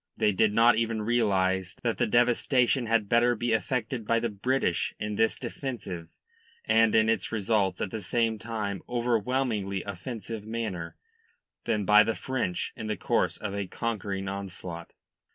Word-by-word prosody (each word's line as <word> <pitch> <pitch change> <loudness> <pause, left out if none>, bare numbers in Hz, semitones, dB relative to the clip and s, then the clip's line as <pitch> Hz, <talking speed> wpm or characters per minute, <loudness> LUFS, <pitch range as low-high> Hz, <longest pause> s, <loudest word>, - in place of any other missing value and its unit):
They 105 - +3
did 105 +2 +3
not 115 +2 +5
even 115 -1 0
realise 95 -5 +1
that 115 -2 -1
the 120 - +2
devastation 120 +2 +2
had 110 -2 +2
better 120 +2 +3
be 120 +1 0
effected 110 +1 -1
by 115 0 +3
the 115 0 -1
British 105 -2 0
in 105 0 -3
this 110 +2 +1
defensive 100 - -5 0.6
and 115 0 +4
in 110 0 +5
its 115 - 0
results 105 -2 0
at 95 - -2
the 110 - -4
same 115 +2 0
time 105 -4 -3
overwhelmingly 115 -4 0
offensive 110 +2 -6
manner 110 -7 -4 0.7
than 105 -3 0
by 105 +2 +7
the 115 - -1
French 120 -10 -2
in 110 - -6
the 105 - -2
course - - 0
of 105 -2 -5
a 100 -1 -3
conquering 100 -3 -3
onslaught. 95 -3 -6
110 Hz, 155 wpm, -28 LUFS, 100-115 Hz, 0.7 s, by